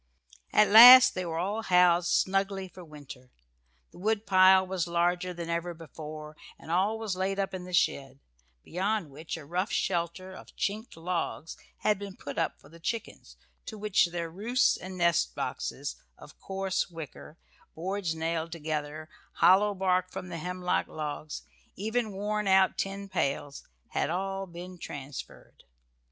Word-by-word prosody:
At 210 Hz, -, +5 dB
last 245 Hz, +4 st, +11 dB
they 185 Hz, -1 st, -3 dB
were 165 Hz, -1 st, -3 dB
all 200 Hz, +6 st, -1 dB
housed 180 Hz, -3 st, +4 dB
snugly 195 Hz, 0 st, +1 dB
for 180 Hz, 0 st, -13 dB
winter. 145 Hz, -5 st, -12 dB, 0.6 s
The -, -, -15 dB
woodpile 190 Hz, -2 st, +4 dB
was 185 Hz, -2 st, -2 dB
larger 175 Hz, +1 st, 0 dB
than 170 Hz, -1 st, -6 dB
ever 170 Hz, +1 st, -3 dB
before, 155 Hz, -1 st, -9 dB, 0.2 s
and 160 Hz, -, -10 dB
all 195 Hz, +6 st, +1 dB
laid 195 Hz, -3 st, -2 dB
up 195 Hz, -1 st, -2 dB
in 180 Hz, -1 st, -6 dB
the 180 Hz, -, -9 dB
shed, 135 Hz, -6 st, 0 dB, 0.4 s
beyond 190 Hz, -2 st, -2 dB
which 155 Hz, +4 st, -6 dB
a 155 Hz, -, -10 dB
rough 180 Hz, +7 st, -2 dB
shelter 175 Hz, +2 st, -2 dB
of -, -, -13 dB
chinked 215 Hz, -1 st, -3 dB
logs 165 Hz, -1 st, -3 dB, 0.3 s
had 210 Hz, -2 st, +2 dB
been 200 Hz, -2 st, -7 dB
put 140 Hz, -, -6 dB
up -, -, -1 dB
for -, -, -18 dB
the 165 Hz, +3 st, -16 dB
chickens, 225 Hz, +6 st, -5 dB, 0.3 s
to 220 Hz, -, -7 dB
which 210 Hz, -3 st, +2 dB
their 170 Hz, -1 st, -5 dB
roosts 230 Hz, +8 st, +2 dB
and 185 Hz, +1 st, -8 dB
nest 170 Hz, -, +2 dB
boxes, -, -, -4 dB, 0.2 s
of -, -, -15 dB
coarse 190 Hz, 0 st, -2 dB
wicker, 160 Hz, -1 st, -10 dB, 0.4 s
boards 180 Hz, 0 st, -3 dB
nailed 165 Hz, 0 st, -2 dB
together, 155 Hz, -1 st, -4 dB, 0.3 s
hollow 200 Hz, +2 st, +4 dB
bark 185 Hz, -1 st, +1 dB
from 185 Hz, -, -7 dB
the 170 Hz, -2 st, -5 dB
hemlock 180 Hz, +1 st, -1 dB
logs, 150 Hz, 0 st, -6 dB, 0.3 s
even 220 Hz, +2 st, -2 dB
worn 210 Hz, +1 st, -2 dB
out 190 Hz, 0 st, +4 dB
tin 195 Hz, +1 st, -4 dB
pails, 140 Hz, -6 st, -2 dB, 0.3 s
had -, -, -1 dB
all 195 Hz, +2 st, -3 dB
been 175 Hz, +1 st, -10 dB
transferred. 140 Hz, -3 st, -9 dB
180 Hz, 150 wpm, -29 LUFS, 165-195 Hz, 0.6 s, last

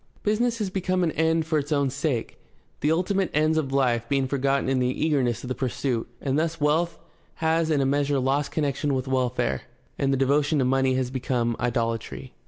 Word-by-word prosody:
Business 230 Hz, +3 st, +1 dB
has 205 Hz, -4 st, -2 dB
become 185 Hz, -1 st, 0 dB
an 165 Hz, -, +1 dB
end 160 Hz, +1 st, +1 dB
for 160 Hz, -1 st, +1 dB
its 145 Hz, +2 st, -6 dB
own 140 Hz, -3 st, +2 dB
sake, 140 Hz, -4 st, -2 dB, 0.4 s
the 150 Hz, -, +1 dB
ultimate 185 Hz, +2 st, +1 dB
ends 155 Hz, +1 st, +3 dB
of 150 Hz, -4 st, -1 dB
life 120 Hz, -4 st, +1 dB
being 135 Hz, -1 st, +1 dB
forgotten 135 Hz, 0 st, 0 dB
in 135 Hz, -1 st, +1 dB
the 125 Hz, -, +2 dB, 0.2 s
eagerness 130 Hz, -7 st, +1 dB
of -, -, -6 dB
the 130 Hz, -, -1 dB
pursuit, 125 Hz, -2 st, -2 dB
and 140 Hz, +1 st, 0 dB
thus 165 Hz, +1 st, -1 dB
wealth 160 Hz, +3 st, +1 dB, 0.4 s
has 160 Hz, 0 st, +1 dB
in 150 Hz, -3 st, +2 dB
a -, -, +2 dB
measure 140 Hz, +1 st, +1 dB
lost 135 Hz, +2 st, 0 dB
connection 145 Hz, -1 st, 0 dB
with 130 Hz, 0 st, -2 dB
welfare, 125 Hz, -2 st, 0 dB, 0.4 s
and 135 Hz, -1 st, +1 dB
the 135 Hz, -, +2 dB
devotion 145 Hz, +3 st, +2 dB
to 130 Hz, -, +2 dB
money 130 Hz, 0 st, +2 dB
has 130 Hz, -1 st, -1 dB
become 120 Hz, -2 st, -1 dB
idolatry. 115 Hz, -2 st, -2 dB
140 Hz, 195 wpm, -25 LUFS, 130-160 Hz, 0.4 s, ends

